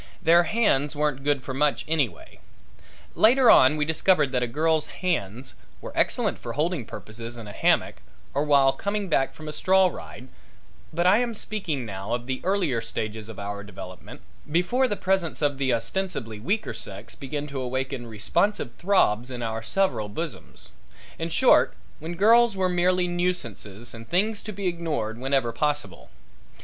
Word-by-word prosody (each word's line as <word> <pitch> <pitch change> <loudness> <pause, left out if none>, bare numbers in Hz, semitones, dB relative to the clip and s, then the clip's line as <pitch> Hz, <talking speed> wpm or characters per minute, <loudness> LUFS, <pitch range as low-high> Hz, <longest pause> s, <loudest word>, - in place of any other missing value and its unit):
Their 170 +1 +6
hands 155 -11 +1
weren't 145 -2 -1
good 145 -2 +1
for 130 - -5
much 145 +1 +1
anyway. 150 -8 -2 0.7
Later 245 +1 +6
on 130 +4 +6
we 150 - +1
discovered 160 -2 +2
that 125 -2 0
a 125 - 0
girl's 155 +5 +1
hands 130 - -2 0.3
were - - -8
excellent - - +1
for - - -6
holding 155 -3 -1
purposes 115 +3 -6
in 115 - -8
a - - -7
hammock - - +1 0.4
or 140 - +1
while 140 -2 +4
coming 200 -1 -3
back 135 -4 +1
from 155 - -10
a 150 - -4
straw 190 +4 +4
ride, 130 -6 -10 0.6
but 170 +2 0
I 190 +5 +6
am 240 -2 -1
speaking 190 - -3
now 100 +2 -3
of 120 0 -6
the 130 0 -3
earlier 175 - +1
stages 110 -1 -4
of 110 - -9
our 100 0 -5
development, 95 -3 -10 0.3
before 180 - +2
the 205 - -1
presence 190 -4 0
of 145 -2 0
the 135 -2 +1
ostensibly 115 - -2
weaker 200 - -1
sex 105 -3 -5
began 145 +2 -5
to 140 -2 -4
awaken 130 -1 -3
responsive 120 - 0
throbs 130 - +2
in 125 -2 -5
our 115 0 -3
several 110 - 0
bosoms 160 +7 -6 0.5
in 165 +1 -2
short 250 +10 +4 0.2
when 165 +3 -6
girls 225 +3 +5
were 185 -1 +1
merely 180 0 +2
nuisances 120 - -3
and 115 0 -11
things 205 +4 +1
to 215 - -6
be 200 -1 -6
ignored 160 -11 -2
whenever 135 -2 +1
possible. 145 - -2
145 Hz, 165 wpm, -25 LUFS, 120-180 Hz, 0.7 s, Their